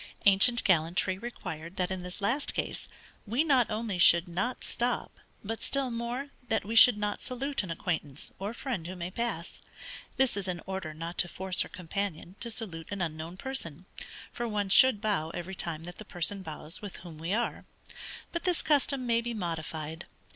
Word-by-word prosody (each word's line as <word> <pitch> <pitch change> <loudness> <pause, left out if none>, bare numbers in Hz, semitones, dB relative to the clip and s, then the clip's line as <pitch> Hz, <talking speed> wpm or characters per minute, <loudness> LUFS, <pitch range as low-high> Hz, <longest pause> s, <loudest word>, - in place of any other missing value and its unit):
Ancient 205 +5 +6
gallantry 185 +1 +2
required 170 -7 -6
that 180 0 0
in 185 -1 -2
this 180 +3 -6
last 240 +9 0
case, - - -2 0.4
we 240 +8 +2
not 270 -6 +4
only 215 -4 -2
should 170 0 +7
not 190 +9 -2
stop, 240 0 0 0.3
but 225 +2 -4
still 275 -2 +2
more, 240 +4 -3 0.2
that 220 -2 +1
we 225 +2 -3
should 225 -1 +10
not 210 0 -2
salute 270 +3 0
an 190 - -7
acquaintance, 160 -4 -3
or 200 +2 -2
friend 235 - -4
who 185 - -5
may 175 0 -4
pass; 210 -6 -3 0.6
this 265 -4 +3
is 200 -2 -3
in 180 -2 -2
order 190 -5 -4
not 165 +2 -5
to 175 - +4
force 190 +1 +1
her - - -2
companion 180 0 -4
to 235 - -2
salute 185 -9 -3
an 200 - -4
unknown 165 0 -3
person 185 - -4 0.5
(for 240 - -2
one 205 -3 -1
should 230 +1 +7
bow 200 -8 0
every 175 +2 -5
time 165 -3 -2
that 175 +1 -8
the - - -5
person 195 0 -1
bows 160 -1 -7
with 205 -3 -6
whom 160 -3 -9
we 165 +3 -3
are;) 235 +3 -1 0.7
but 340 - -3
this 360 -3 +1
custom 275 -3 +3
may 235 -1 +3
be 235 0 -3
modified. 160 -3 -4
195 Hz, 185 wpm, -30 LUFS, 170-235 Hz, 0.7 s, should